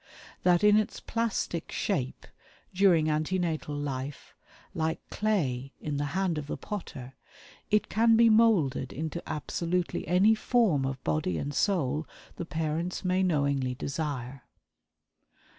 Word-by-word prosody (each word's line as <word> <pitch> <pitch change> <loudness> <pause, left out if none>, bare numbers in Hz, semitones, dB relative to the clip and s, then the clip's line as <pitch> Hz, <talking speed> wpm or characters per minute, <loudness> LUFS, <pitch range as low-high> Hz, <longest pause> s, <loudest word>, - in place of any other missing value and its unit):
That 180 +1 +3
in 210 0 +6
its 215 - -1
plastic 220 -7 -2
shape, 135 -11 -2 0.5
during 180 -5 +4
ante 155 +4 0
natal 160 -4 -2
life, 140 -1 -5 0.4
like 160 0 -1
clay 140 -12 -1
in 150 -2 -3
the 145 - -1
hand 185 -5 0
of 145 - -7
the - - -4
potter, 135 - -7 0.6
it 210 0 +2
can 225 +1 +4
be 230 0 +6
molded 215 - +3
into 160 +3 -4
absolutely 170 +4 -2
any 185 +6 +5
form 215 - +2
of 135 -1 -5
body 80 +2 0
and 145 - -3
soul 155 -5 0 0.3
the 175 - -4
parents 165 +3 -2
may 185 +1 +2
knowingly 140 -7 +1
desire." 135 -2 -4
160 Hz, 130 wpm, -29 LUFS, 140-190 Hz, 0.6 s, in